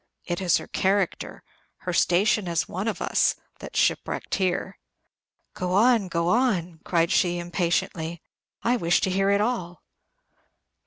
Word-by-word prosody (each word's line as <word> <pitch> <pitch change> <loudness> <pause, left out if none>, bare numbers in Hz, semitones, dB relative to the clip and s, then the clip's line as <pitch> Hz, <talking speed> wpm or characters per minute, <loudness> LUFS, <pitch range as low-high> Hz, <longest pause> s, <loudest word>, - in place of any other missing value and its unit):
It 175 +1 -3
is 180 -2 +3
her - - -7
character 195 0 -1 0.4
her 180 - -3
station 185 +4 +2
as 170 -1 0
one 190 +5 -4
of 220 - -2
us - - +2 0.2
that's - - -8
shipwrecked - - 0
here." 190 0 -1 0.7
"Go 180 0 -3
on, 225 0 +4
go 170 -1 -1
on," 180 -9 +1
cried 170 -1 +1
she, 175 -1 +2
impatiently; 170 -1 -2 0.4
"I 245 +1 +2
wish 170 -5 +2
to 190 - 0
hear 195 +1 +1
it 200 0 +3
all." 185 -7 -3
180 Hz, 145 wpm, -25 LUFS, 175-200 Hz, 0.7 s, on